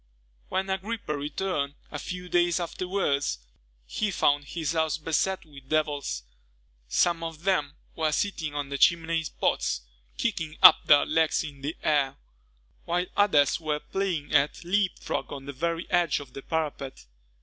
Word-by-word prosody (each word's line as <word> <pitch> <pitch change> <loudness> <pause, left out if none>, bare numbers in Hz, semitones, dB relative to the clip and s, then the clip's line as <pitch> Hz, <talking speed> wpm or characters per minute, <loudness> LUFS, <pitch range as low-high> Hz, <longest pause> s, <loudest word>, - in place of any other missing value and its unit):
When 190 +1 -1
Agrippa 190 -4 -3
returned, 145 0 -2 0.2
a 145 - -4
few 180 +3 -6
days 175 0 +2
afterwards, 170 - -1 0.5
he 210 - -1
found 145 -6 +2
his 160 +1 -3
house 160 -2 +1
beset 165 +4 -1
with 140 -3 -15
devils. 145 - -1 0.6
Some 170 - +2
of 165 0 -6
them 150 -7 +1 0.2
were 160 -1 +1
sitting 155 -4 -1
on 145 -1 -3
the 140 0 -3
chimney 165 -1 +3 0.2
pots, - - +1 0.4
kicking 160 -1 -2
up - - +9
their 145 -1 +7
legs 160 -1 +2
in 145 -3 -9
the 145 +4 -4
air; 140 -3 +2 0.7
while 175 +1 0
others 160 -10 +4
were 155 -2 -1
playing 170 -5 -3
at 145 +2 +2
leapfrog 190 +2 -1
on 135 -1 -7
the 140 - -6
very 170 +4 -2
edge 175 -4 +2
of 140 -3 -11
the 135 - -7
parapet. 145 - -3
160 Hz, 150 wpm, -27 LUFS, 145-175 Hz, 0.7 s, up